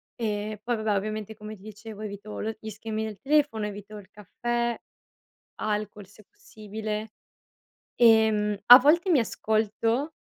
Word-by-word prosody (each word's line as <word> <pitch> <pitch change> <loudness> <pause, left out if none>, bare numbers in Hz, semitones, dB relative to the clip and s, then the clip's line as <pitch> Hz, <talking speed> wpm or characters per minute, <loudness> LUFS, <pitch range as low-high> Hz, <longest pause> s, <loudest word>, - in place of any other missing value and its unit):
E 210 -2 -3
poi 240 +1 0
vabbè 215 -2 0
ovviamente 215 +1 -4
come 215 0 -9
ti 190 - -19
dicevo 215 +1 -10
evito 210 0 -7
l 220 +1 -4
gli 220 - -7
schermi 220 +1 -4
del 215 -2 -7
telefono, 280 -6 +1
evito 205 0 -8
il 200 -2 -13
caffè, 235 +4 -3 0.8
alcol 210 -1 -3
se 205 +3 -19
possibile, 215 - -7 0.8
ehm, 220 -3 +4
a 245 - +12
volte 335 +7 +3
mi 310 - +5
ascolto 225 +6 -1
215 Hz, 140 wpm, -26 LUFS, 210-230 Hz, 0.8 s, a